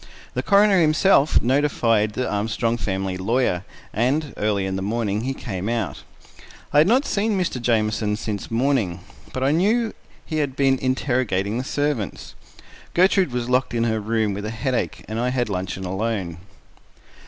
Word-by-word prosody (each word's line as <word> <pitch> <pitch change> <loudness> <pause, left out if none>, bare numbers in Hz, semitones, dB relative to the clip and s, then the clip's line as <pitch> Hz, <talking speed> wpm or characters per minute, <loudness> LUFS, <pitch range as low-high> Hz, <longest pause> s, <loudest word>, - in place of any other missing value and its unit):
The - - -1
coroner 200 -2 +4
himself 155 -1 +4
notified 115 -5 +2
the 130 - -2
Armstrong 110 +3 0
family 95 -3 -2
lawyer, 100 -2 0 0.3
and 135 +6 0
early 105 -2 0
in 95 0 -2
the 95 - -3
afternoon 105 0 -1
he 135 +3 -2
came 100 -4 -4
out. 110 - -2 0.7
I 145 - +6
had 155 - +5
not 255 +7 +3
seen 205 -1 0
Mr. 170 -9 -2
Jamieson 110 -2 +1
since 105 -2 -4
morning, 115 -8 0 0.3
but 130 - -3
I 135 - +3
knew 215 +8 +2 0.3
he 155 - -3
had 140 -4 -1
been 135 -2 +2
interrogating 120 -5 0
the - - -2
servants. 145 -6 -2 0.6
Gertrude 185 -3 +4
was 120 -1 -2
locked 125 -1 +1
in 115 - +1
her 110 -1 0
room 110 -1 0
with 100 +1 -5
a - - -2
headache, 125 +2 -2
and 110 +1 -3
I 125 +1 +1
had 125 -3 -1
luncheon 95 0 -3
alone. 95 -3 -2
120 Hz, 165 wpm, -23 LUFS, 105-140 Hz, 0.7 s, I